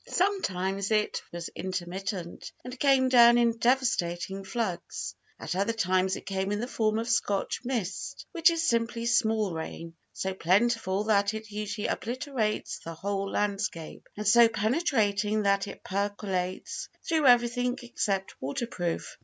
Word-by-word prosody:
Sometimes 195 - 0
it 215 -1 +1
was 170 -1 -5
intermittent, 185 0 -5
and 250 +1 -8
came 270 -2 +4
down 240 -2 +7
in 235 -1 +2
devastating 195 -7 +1
floods. 190 -3 -3 0.3
At - - -4
other 200 +4 +1
times 185 -3 +1
it - - -9
came 190 0 -2
in 205 - -1
the 240 - -2
form 220 -3 0
of 230 +1 -2
Scotch 205 -3 0
mist, 235 -7 -3
which 340 -2 +5
is 330 -1 0
simply 230 0 0
small 220 -5 +2
rain, 165 +1 -6 0.2
so 190 0 -3
plentiful 195 +2 +2
that 205 -1 +2
it 220 -1 -7
usually 210 0 -4
obliterates 240 -2 -2
the 165 0 -8
whole 195 +3 -2
landscape, 200 -6 -3
and 210 -1 -3
so 235 +2 +8
penetrating 215 - +1
that 200 0 +2
it - - -9
percolates 195 -2 -3 0.2
through 315 -4 +3
everything 245 +1 +3
except 195 -5 -2
water 140 - -2
proof. 175 -7 -4
210 Hz, 145 wpm, -28 LUFS, 190-235 Hz, 0.3 s, so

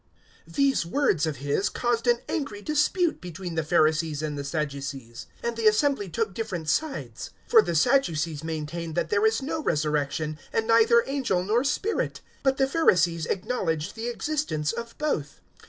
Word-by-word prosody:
023:007 - - -15
These 275 - +2
words 185 - +2
of 155 - -2
his 145 +9 0
caused 240 0 -1
an 240 0 +3
angry 275 -10 -3
dispute 310 +3 +1
between 180 0 -6
the 160 - 0
Pharisees 155 -1 +2
and 150 -1 -2
the 140 - -4
Sadducees, 140 -5 -4 0.2
and 235 0 -1
the 225 -1 +2
assembly 215 -1 +2
took 215 +3 -2
different 180 -7 -4
sides. 305 - -2 0.2
023:008 - - -19
For 455 -2 +9
the 170 - -2
Sadducees 165 - +2
maintain 160 +1 -4
that 170 -2 -1
there 205 +1 +4
is 220 +4 0
no 310 +3 -2
resurrection, 150 - -1
and 225 - 0
neither 230 +1 +5
angel 260 -10 0
nor 220 +6 +2
spirit; 385 +10 -1 0.2
but 270 0 +2
the 270 - +3
Pharisees 180 - +2
acknowledge 175 -7 -2
the 225 +1 -5
existence 240 - -1
of 235 0 -7
both. 170 - -2
190 Hz, 170 wpm, -26 LUFS, 155-250 Hz, 0.2 s, For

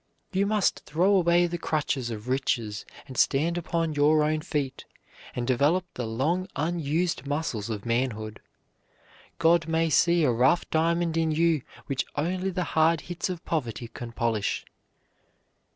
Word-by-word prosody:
You 195 +2 +2
must 210 -2 +1
throw 180 +6 +3
away 175 -1 +4
the 175 0 -3
crutches 145 -6 -1
of 110 0 -6
riches 120 -5 -1 0.2
and 130 - -10
stand 160 +8 +2
upon 165 -2 -1
your 150 +1 +4
own 155 +1 0
feet, 145 -5 -3 0.5
and 125 - -2
develop 145 +9 +2
the 120 -2 -4
long 155 +12 0
unused 165 0 -1
muscles 145 -8 -2
of 105 -3 -4
manhood. 115 -3 -1 1.0
God 170 0 +3
may 165 0 +1
see 170 +2 +4
a 135 - +4
rough 130 +8 +3
diamond 165 +1 +1
in 165 -1 +2
you 160 -1 +2 0.2
which 135 -2 -1
only 180 +5 -1
the 180 -1 -1
hard 160 0 +3
hits 175 +1 -4
of 180 -2 -5
poverty 120 -7 -3
can 120 0 -8
polish. 115 -3 -1
155 Hz, 150 wpm, -27 LUFS, 130-170 Hz, 1.0 s, away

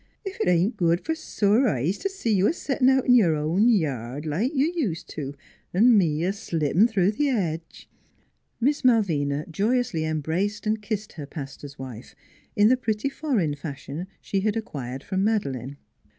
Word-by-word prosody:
" - - -45
Ef 385 - -4
it - - +1
ain't 180 +6 +2
good 170 -1 +2
f'r 320 - -1
sore 225 -4 +2
eyes 155 - 0
t' 390 - -1
see 385 - -1
you 195 0 +3
a - - +2
settin' 270 -5 +1
out 265 -1 +3
in 250 - +5
your 190 -10 +5
own 165 +10 +2
yard, 145 - -1
like 180 - 0
you 305 - +1
ust' 160 - -8
to, 145 -2 -6 0.4
an' 230 +5 +6
me 165 -5 +2
a 190 +2 +1
slippin' 175 -1 +1
through 200 -4 +2
the 290 +7 0
hedge." 170 - -3 0.7
Miss 280 +4 +1
Malvina 155 - +2
joyously 205 0 0
embraced 160 +8 -2
and 215 0 0
kissed 210 0 -4
her 150 -4 -8
pastor's 140 -1 -8
wife, 130 -3 -9 0.4
in 205 0 +5
the 255 +3 +4
pretty 220 +1 -1
foreign 250 - -1
fashion 145 +3 -6
she 195 - -1
had 215 +3 0
acquired 135 - -5
from 190 -1 -1
Madeleine. 140 - -1
195 Hz, 180 wpm, -25 LUFS, 150-230 Hz, 0.7 s, an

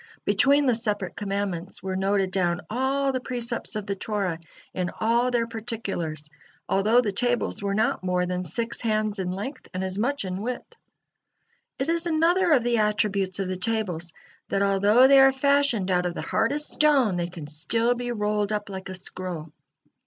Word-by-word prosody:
Between 280 +1 +4
the 250 - +4
separate 210 -5 -1
commandments 195 -3 -3
were 190 -1 -3
noted 195 0 +1
down 175 -2 0
all 270 +3 +1
the 260 - -1
precepts 240 -3 -3
of 210 -2 -3
the 200 - -2
Torah 195 -5 -2 0.3
in 180 -1 -2
all 235 +3 +2
their 240 -2 +1
particulars, 205 -10 -4 0.4
although 215 +5 +3
the 215 -4 -1
tables 240 +1 0
were 200 0 -1
not 220 -3 0
more 180 -1 +1
than 180 0 -2
six 230 +8 -2
hands 215 -2 0
in 185 -1 -2
length 205 +10 -6
and 185 - -2
as 190 +1 -2
much 275 0 0
in 185 +1 -4
width. 245 +3 -5 1.0
It 270 - -2
is 335 +1 +1
another 340 +3 +3
of 265 -6 +4
the 240 -1 +1
attributes 200 -3 +1
of 195 - -1
the 185 - -2
tables, 180 -5 -2 0.4
that 200 0 +1
although 200 +5 +5
they 275 0 +7
are 270 0 +7
fashioned 270 -7 +2
out 180 0 +2
of 175 - -5
the - - -4
hardest 285 +7 0
stone, 275 -10 +3
they 175 -1 -1
can 170 -3 -9
still 225 +11 +1
be 245 0 -4
rolled 210 -2 -1
up 210 -1 -2
like 190 0 -7
a 185 - -5
scroll. 180 -3 -6
210 Hz, 180 wpm, -25 LUFS, 185-245 Hz, 1.0 s, they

